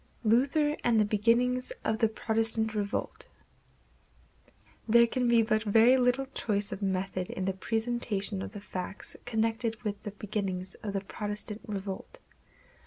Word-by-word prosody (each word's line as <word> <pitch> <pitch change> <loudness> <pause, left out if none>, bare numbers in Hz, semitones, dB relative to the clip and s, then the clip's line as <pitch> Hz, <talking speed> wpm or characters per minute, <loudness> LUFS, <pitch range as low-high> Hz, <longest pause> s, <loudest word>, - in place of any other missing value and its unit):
Luther 275 +7 +3
and 230 -2 +3
the 215 - +4
Beginnings 235 +4 +2
of 220 0 0
the 225 - +4
Protestant 220 0 0
Revolt. 205 -1 -3 1.6
There 235 +1 +7
can 250 +1 0
be 235 -1 +5
but 215 -1 +1
very 225 +4 +5
little 255 +1 +2
choice 205 -2 -1
of 195 - -5
method 190 -1 -2
in 185 - -3
the 195 - 0
presentation 220 -1 0
of - - -5
the 205 - -7
facts 190 0 -6
connected 225 0 -1
with 205 -2 -3
the 210 - -5
beginnings 195 -3 -4
of 205 -2 -4
the 195 - -1
Protestant 210 +1 -5
revolt. 195 -2 -5
220 Hz, 145 wpm, -30 LUFS, 200-235 Hz, 1.6 s, There